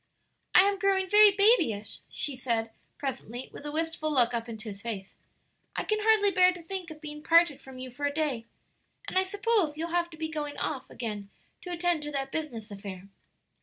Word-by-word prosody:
"I 360 - +10
am 395 0 +2
growing 385 -1 +2
very 420 +2 +8
babyish," 395 - +3
she 285 - -1
said 230 -3 -1 0.3
presently 255 -3 -5
with 295 - -7
a - - -3
wistful 320 0 -1
look 245 -4 +4
up 235 0 -3
into 220 0 -7
his 200 -1 -9
face; 205 -4 -5 0.6
"I - - -1
can 430 0 0
hardly 420 -2 +4
bear 365 -1 +6
to 350 -1 -10
think 365 0 -5
of 310 -1 -10
being 300 -1 -7
parted 335 -3 +4
from 265 -1 -11
you 255 0 -7
for 285 +4 -4
a - - -1
day; 285 -7 -2 0.6
and - - -5
I 375 - +6
suppose 400 -5 +1
you'll 330 +2 -3
have 345 0 0
to 320 - -12
be 320 0 -2
going 300 -2 -4
off 265 -3 -3
again 210 -4 -5 0.3
to 360 - -7
attend 345 -2 +1
to 295 0 -5
that 270 -1 -2
business 240 -9 -4
affair?" 195 -1 -8
300 Hz, 205 wpm, -29 LUFS, 240-360 Hz, 0.6 s, I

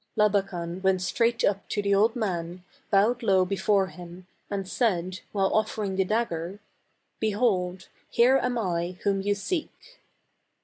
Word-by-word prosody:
Labakan 190 -4 0
went 190 -1 +2
straight 230 +5 +1
up 200 0 0
to - - -2
the 200 0 +1
old 220 +4 +3
man, 180 -5 -3 0.3
bowed 220 +4 +3
low 190 -4 +3
before 195 +1 +2
him 180 -1 -11 0.2
and 195 -2 -3
said, 185 -4 0
while 195 -2 +1
offering 215 -2 0
the 190 - +2
dagger, 190 -4 -2 0.3
" - - -47
Behold, 200 -4 0 0.2
here 255 +3 +4
am 250 -1 -1
I 175 -4 -2
whom 195 -1 +1
you 205 +1 +1
seek 360 - -5
195 Hz, 145 wpm, -27 LUFS, 185-220 Hz, 0.3 s, here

